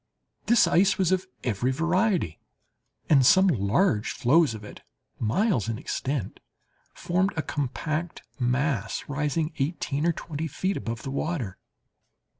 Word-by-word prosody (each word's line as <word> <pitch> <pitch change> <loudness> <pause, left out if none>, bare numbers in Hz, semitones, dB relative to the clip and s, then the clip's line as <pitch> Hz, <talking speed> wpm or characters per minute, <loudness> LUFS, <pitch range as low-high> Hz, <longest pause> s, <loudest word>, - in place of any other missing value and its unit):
This 235 +2 +5
ice 190 +4 +3
was 185 -2 +2
of 185 0 0 0.2
every 120 +2 0
variety—and 165 - -1
some 190 +9 +6
large 115 - +2
floes 140 0 +3
of 110 - -9
it, 105 - -11 0.4
miles 115 - +1
in 115 - -2
extent, 135 -3 -3 0.6
formed 185 +3 0
a 160 - 0
compact 155 +4 -3 0.2
mass, 125 -3 0
rising 150 +3 -1
eighteen 150 +1 -1
or - - +4
twenty 160 0 -5
feet 190 +6 -2
above 115 -1 -5
the 135 - -4
water. 140 - -3
150 Hz, 125 wpm, -26 LUFS, 125-175 Hz, 0.6 s, some